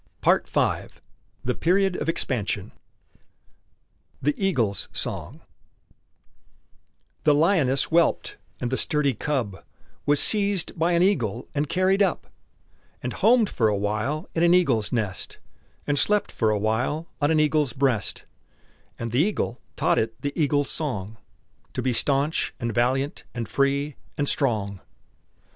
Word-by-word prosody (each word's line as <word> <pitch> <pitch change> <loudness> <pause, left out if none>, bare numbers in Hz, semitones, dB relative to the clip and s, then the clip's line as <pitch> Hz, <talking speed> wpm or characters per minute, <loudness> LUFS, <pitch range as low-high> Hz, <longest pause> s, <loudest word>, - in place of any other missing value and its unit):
PART - - +2
V - - 0 0.6
THE 125 - 0
PERIOD 185 - +2
OF 150 - -2
EXPANSION 110 - -2 1.5
THE 145 +3 +1
EAGLE'S 120 - 0
SONG - - -4 1.8
The 150 -1 +5
lioness 150 -5 +3
whelped, 170 0 +2 0.2
and 120 - -3
the 130 - 0
sturdy 150 -3 +1
cub 120 -8 -3 0.4
Was 145 0 +4
seized 200 -4 +2
by 170 +2 +2
an 170 +1 +4
eagle 120 - 0
and 145 0 -1
carried 190 +2 +2
up, 190 -4 +1 0.8
And 125 - -3
homed 225 +1 +4
for 115 - +1
a 105 -1 +1
while 110 - -2
in 165 - 0
an 170 +1 +5
eagle's 130 - +2
nest, 110 -6 -2 0.5
And 145 -1 +1
slept 210 0 +2
for 110 - +1
a 105 - +2
while 125 +10 -1
on 145 - +3
an 160 -1 +3
eagle's 150 -4 +2
breast; 130 -6 0 0.7
And 115 -1 -4
the 120 - +1
eagle 170 - 0
taught - - +2
it 115 +1 -2
the 145 0 -2
eagle's 145 -3 +1
song: 115 -9 -2 0.6
"To - - -2
be 130 0 +1
stanch, 140 +5 +1
and 120 -1 -2
valiant, 130 +5 0
and 115 -2 -3
free, 140 +1 0 0.2
and 145 - 0
strong!" 105 -10 0
140 Hz, 140 wpm, -25 LUFS, 115-165 Hz, 1.8 s, The